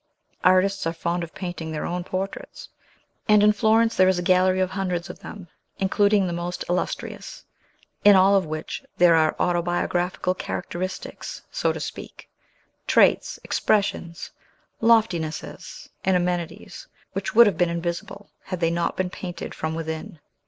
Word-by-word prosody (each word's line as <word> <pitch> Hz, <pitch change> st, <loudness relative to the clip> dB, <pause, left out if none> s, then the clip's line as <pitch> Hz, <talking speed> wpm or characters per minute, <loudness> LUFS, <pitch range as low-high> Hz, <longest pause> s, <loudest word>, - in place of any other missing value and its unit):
Artists 185 Hz, 0 st, +3 dB
are 165 Hz, -, -1 dB
fond 170 Hz, +1 st, -2 dB
of 165 Hz, -, -9 dB
painting 175 Hz, -4 st, -5 dB
their 155 Hz, -, -3 dB
own 175 Hz, 0 st, -3 dB
portraits; 190 Hz, +2 st, -6 dB, 0.6 s
and, 210 Hz, -1 st, +6 dB
in 210 Hz, 0 st, +6 dB
Florence, 225 Hz, +2 st, +3 dB
there 185 Hz, -, +5 dB
is 185 Hz, -1 st, +3 dB
a 175 Hz, -, -2 dB
gallery 185 Hz, +1 st, +3 dB
of 185 Hz, 0 st, 0 dB
hundreds 185 Hz, -2 st, -2 dB
of -, -, -15 dB
them, 195 Hz, -4 st, -10 dB, 0.3 s
including 200 Hz, +1 st, +2 dB
the 175 Hz, -, -2 dB
most 175 Hz, +1 st, -4 dB
illustrious, 180 Hz, +1 st, -4 dB, 0.6 s
in 205 Hz, -1 st, +8 dB
all 190 Hz, +1 st, +5 dB
of 195 Hz, -, +3 dB
which 155 Hz, -, -5 dB
there 175 Hz, -1 st, +6 dB
are 160 Hz, -1 st, +3 dB
autobiographical 175 Hz, +1 st, 0 dB
characteristics, 185 Hz, 0 st, -5 dB
so -, -, 0 dB
to -, -, -5 dB
speak, -, -, -8 dB, 0.6 s
traits, -, -, +3 dB
expressions, 195 Hz, -5 st, -1 dB, 0.5 s
loftinesses, 215 Hz, -9 st, 0 dB, 0.2 s
and 190 Hz, -1 st, +3 dB
amenities, 175 Hz, -1 st, -4 dB, 0.3 s
which -, -, -4 dB
would 235 Hz, +1 st, +9 dB
have 205 Hz, -, +3 dB
been 175 Hz, +1 st, +2 dB
invisible, 170 Hz, +4 st, -5 dB
had 185 Hz, -2 st, -4 dB
they 165 Hz, -1 st, +1 dB
not 170 Hz, 0 st, -1 dB
been 185 Hz, -1 st, -1 dB
painted 175 Hz, -3 st, -6 dB
from 160 Hz, 0 st, -3 dB
within. 160 Hz, 0 st, -5 dB
180 Hz, 150 wpm, -24 LUFS, 170-195 Hz, 0.6 s, would